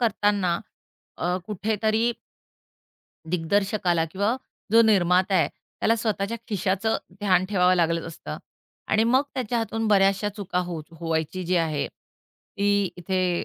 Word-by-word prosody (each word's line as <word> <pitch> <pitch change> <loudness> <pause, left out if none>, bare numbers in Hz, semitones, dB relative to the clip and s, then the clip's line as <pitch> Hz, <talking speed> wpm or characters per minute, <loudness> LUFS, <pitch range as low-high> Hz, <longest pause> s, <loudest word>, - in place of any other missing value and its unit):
करताना 205 -6 +1 0.6
अ, 180 +1 0
कुठेतरी 220 +3 0 1.2
दिग्दर्शकाला 180 0 +1
किंवा 200 +8 -1 0.4
जो 230 +1 +8
निर्माता 190 -3 +3
आहे, 175 - +3
त्याला 230 - -2
स्वतःच्या 215 -1 -1
खिशाचं 205 +1 0 0.2
ध्यान 185 -3 +3
ठेवावं 185 -2 +4
लागलं 165 -2 +1
असतं. 165 - -7 0.5
आणि 215 +1 +3
मग 255 +4 +4
त्याच्या 245 -2 -1
हातून 225 0 -2
बऱ्याचशा 195 0 +3
चुका 195 -3 -2
होत 165 -2 -7
व्हायची 165 +2 -2
जी 180 +1 +1
आहे, 155 -4 0
ती 200 0 -3
इथे 180 0 0
195 Hz, 120 wpm, -25 LUFS, 175-215 Hz, 1.2 s, जो